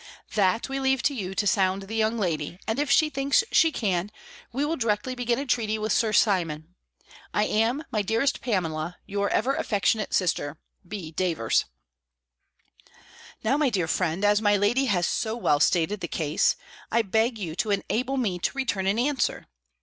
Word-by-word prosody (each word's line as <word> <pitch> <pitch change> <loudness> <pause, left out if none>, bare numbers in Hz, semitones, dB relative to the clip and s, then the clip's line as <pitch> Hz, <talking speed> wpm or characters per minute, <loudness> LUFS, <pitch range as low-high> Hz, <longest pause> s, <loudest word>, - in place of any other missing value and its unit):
That 200 +1 +2
we 270 0 -3
leave 265 -1 +2
you 195 -8 -5
to 205 - 0
sound 195 -2 +2
the 200 +3 -8
young 220 +1 +1
lady; 170 -5 -2
and 225 +4 -1
if 290 -1 0
she 305 +2 +4
thinks 275 - +2
she 325 - +5
can, 195 - -1 0.4
we 275 +4 -1
will 320 +2 -1
directly 230 -1 -1
begin 245 -1 -1
a 280 - -3
treaty 220 -4 0
with 215 0 -1
Sir 225 -2 +2
Simon. 170 -6 +1 0.6
I 210 - +3
am, 225 +8 +1
my 215 -4 +1
dearest 225 +7 0
Pamela, 175 -7 -2
your 200 0 -1
ever 270 - +1
affectionate 215 -2 0
sister, 160 -5 0 0.3
B. 180 -5 -6
Davers." 160 -9 0 1.8
Now, 250 +6 +2
my 295 -3 +2
dear 185 -8 0
friend, 180 +3 0
as 205 +1 +4
my 205 -1 +3
lady 230 +7 +2
has 180 -8 +1
so 220 +4 -1
well 150 -11 +2
stated 175 +6 +2
the 170 - -4
case, 155 -2 +1 0.4
I 230 - +3
beg 225 +4 +1
you 170 -6 -5
to 230 -3 -1
enable 245 +6 -1
me 200 -8 -1
to - - 0
return 205 -8 -1
an 200 +3 +1
answer. 265 +1 0
210 Hz, 175 wpm, -26 LUFS, 185-245 Hz, 1.8 s, she